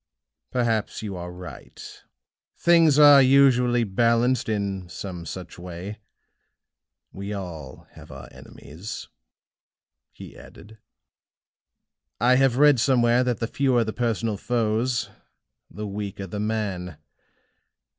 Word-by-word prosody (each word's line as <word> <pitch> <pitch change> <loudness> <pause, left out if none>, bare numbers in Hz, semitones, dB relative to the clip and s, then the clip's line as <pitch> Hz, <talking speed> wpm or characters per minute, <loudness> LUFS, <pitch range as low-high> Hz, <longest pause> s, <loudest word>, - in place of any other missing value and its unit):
"Perhaps 115 -3 -1
you 100 -3 -5
are 90 0 -7
right 90 0 -11 0.6
things 165 -4 +4
are 145 -2 +8
usually 125 -3 +4
balanced 115 +4 +1
in 100 -4 -3
some 90 -2 -7
such 90 +2 -8
way. 90 +4 -8 1.1
We 100 +2 -6
all 80 -9 -8
have - - -15
our 65 -1 -10
enemies," 85 +9 -10 1.0
he - - -12
added. 110 +1 -15 1.4
"I 125 +3 +4
have 135 -2 +2
read 145 -2 +5
somewhere 120 -1 +3
that 125 -4 -1
the - - -1
fewer 130 -2 +1
the 110 -1 -5
personal 115 -3 -1
foes, 120 +2 -1 0.6
the 105 - -7
weaker 100 -1 -6
the 100 +2 -6
man. 100 -6 -3
110 Hz, 110 wpm, -24 LUFS, 95-125 Hz, 1.4 s, are